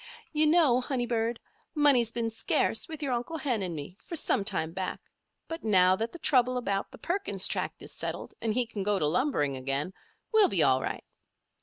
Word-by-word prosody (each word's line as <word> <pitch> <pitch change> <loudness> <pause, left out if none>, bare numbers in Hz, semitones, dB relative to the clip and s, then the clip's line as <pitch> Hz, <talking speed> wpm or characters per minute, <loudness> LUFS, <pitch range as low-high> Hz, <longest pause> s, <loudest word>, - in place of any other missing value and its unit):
"You 305 0 +3
know, 300 -6 +4
honey 250 -1 -2
bird, 230 -1 -1 0.4
money's 275 -6 +4
been 230 -1 -2
scarce 225 - +1
with 315 -1 -6
your 270 -3 0
Uncle 245 +7 -3
Hen 250 -8 -1
and 180 -3 -3
me 155 +6 -8
for 335 - -6
some 215 - +1
time 160 -4 -2
back; 185 +1 -4 0.5
but 325 0 -6
now 185 -4 +5
that 225 +4 -3
the - - -9
trouble 255 -5 +3
about 200 -5 -2
the - - -13
Perkins 390 +3 0
Tract - - -3
is - - -6
settled, - - -5
and 225 - 0
he 250 -1 +2
can 225 -3 -6
go 205 +1 +1
to 155 - 0
lumbering 150 - +1
again, 135 +7 -2 0.4
we'll 435 -3 +5
be 170 -5 +4
all 130 0 +3
right. - - -4
230 Hz, 200 wpm, -29 LUFS, 185-280 Hz, 0.5 s, now